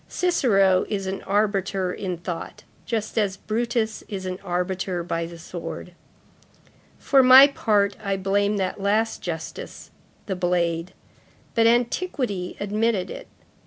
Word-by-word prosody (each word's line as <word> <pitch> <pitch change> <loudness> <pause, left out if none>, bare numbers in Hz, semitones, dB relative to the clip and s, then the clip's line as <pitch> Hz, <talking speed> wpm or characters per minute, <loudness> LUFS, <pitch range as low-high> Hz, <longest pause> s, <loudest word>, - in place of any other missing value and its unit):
Cicero 195 - +3
is 200 -2 -2
an 190 +1 -4
arbiter 195 -2 0
in 185 -3 -4
thought, 170 0 -6 0.2
just 220 -1 -1
as 195 -3 0
Brutus 225 +1 -1
is 195 -3 -5
an 185 0 -4
arbiter 180 -1 -2
by 165 -1 -2
the 170 0 -10
sword. 170 +1 -7 1.0
For 275 -1 +4
my 260 +1 +10
own 280 - -12
part, 205 -4 +2
I 195 -1 -1
blame 200 +2 +1
that 190 0 -2
last 215 +3 +1
justice, 160 -2 -7 0.3
the 190 - -3
blade; 175 -1 0 0.6
but, 230 0 +4
antiquity 240 - 0
admitted 210 -1 0
it. - - -8
195 Hz, 130 wpm, -24 LUFS, 180-220 Hz, 1.0 s, my